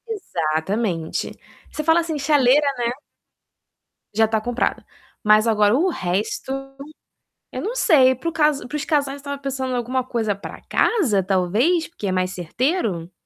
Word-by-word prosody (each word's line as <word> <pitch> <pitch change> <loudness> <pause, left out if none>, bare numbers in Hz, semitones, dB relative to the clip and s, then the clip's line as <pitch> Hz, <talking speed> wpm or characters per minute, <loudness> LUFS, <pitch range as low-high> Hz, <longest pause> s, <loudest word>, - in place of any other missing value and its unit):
Exatamente, 175 - -2 0.4
você 305 - -4
fala 325 +2 +4
assim 325 -2 -3
chaleira, 285 0 +4
né. 240 -1 0 1.2
Já 220 +2 +4
está 220 0 0
comprada. 245 +2 -2 0.4
Mas 215 +1 +5
agora 210 0 +3
o 345 +8 +2
resto, 190 - -2 1.0
eu - - -5
não 460 +4 -3
sei 270 - +5
para 295 +7 -3
o - - -6
caso 300 -4 +1
para 295 - -7
os 300 - -2
casais 280 -3 0
que - - -11
estavam 280 0 -5
pensando 265 -2 -3
alguma 250 +2 -1
coisa 225 -5 -1
para 200 - -10
casa 270 - +2
talvez 205 - +1
porque 275 -12 -6
é - - 0
mais 185 0 0
certeiro? 185 - -2
250 Hz, 155 wpm, -22 LUFS, 205-300 Hz, 1.2 s, Mas